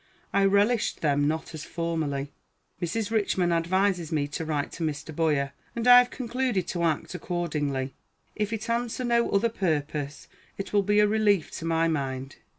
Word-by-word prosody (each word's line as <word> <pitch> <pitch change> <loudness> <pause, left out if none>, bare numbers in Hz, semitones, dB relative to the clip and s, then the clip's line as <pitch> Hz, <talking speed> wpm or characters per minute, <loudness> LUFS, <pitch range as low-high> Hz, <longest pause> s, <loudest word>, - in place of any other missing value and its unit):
I 200 0 +4
relished 205 +4 +2
them 145 -2 +2
not 160 +2 -2
as 155 -1 -6
formerly. 155 -4 -2 0.5
Mrs. 205 +5 -2
Richman 195 -5 +1
advises 175 0 +1
me 145 -3 0
to 165 +3 -4
write 150 -2 -2
to 165 - -5
Mr. 150 0 -4
Boyer, 145 -4 +1 0.2
and 235 +1 -1
I 245 0 +11
have 250 0 +2
concluded 245 -6 -1
to 175 - -2
act 165 0 0
accordingly. 150 -7 -2 0.4
If 210 0 -1
it 225 0 -3
answer 235 +1 -1
no 235 -1 +2
other 200 +4 +3
purpose, 150 -7 -2 0.3
it 195 - -6
will 205 - +5
be 205 +1 +2
a 210 - +5
relief 205 -5 +2
to 165 - -6
my 165 0 +2
mind. 135 -4 -3
170 Hz, 170 wpm, -27 LUFS, 150-210 Hz, 0.5 s, I